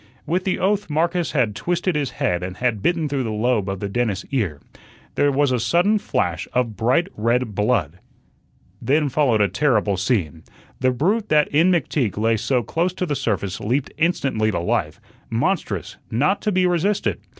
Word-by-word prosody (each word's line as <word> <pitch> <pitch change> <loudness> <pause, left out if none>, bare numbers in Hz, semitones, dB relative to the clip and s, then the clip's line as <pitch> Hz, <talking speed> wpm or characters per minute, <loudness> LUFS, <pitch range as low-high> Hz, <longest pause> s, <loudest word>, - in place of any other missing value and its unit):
With 180 +4 -1
the 190 - 0
oath 205 -1 0
Marcus 170 +3 0
had 120 -8 +1
twisted 175 - -1
his 145 -4 0
head 90 -1 -1
and 90 +1 -5
had 120 -5 0
bitten 170 - +1
through 140 -2 -1
the 120 - -2
lobe 110 -2 0
of 95 -1 -3
the 100 - -2
dentist's 100 -2 -1
ear. 100 - -1 0.5
There 145 0 +2
was 140 0 +2
a 125 - +1
sudden 180 - +2
flash 85 - -2
of 125 -4 0
bright 125 +11 +2
red 115 +1 0
blood. 100 - 0 0.8
Then 145 +2 +2
followed 125 -6 +2
a 100 - +4
terrible 105 -7 +1
scene. 90 - -1 0.4
The 130 - +2
brute 195 - 0
that 150 -1 +3
in 160 +5 +3
McTeague 145 - 0
lay 115 +1 +2
so 125 +2 0
close 170 - -1
to 185 - -2
the 150 -4 -2
surface 100 -6 -2
leaped 130 +6 -1
instantly 135 -10 +1
to 85 - -1
life, 85 - -1 0.3
monstrous, 115 - -2
not 150 - +1
to 210 - 0
be 185 -1 +2
resisted. 180 +3 0
125 Hz, 180 wpm, -22 LUFS, 105-165 Hz, 0.8 s, a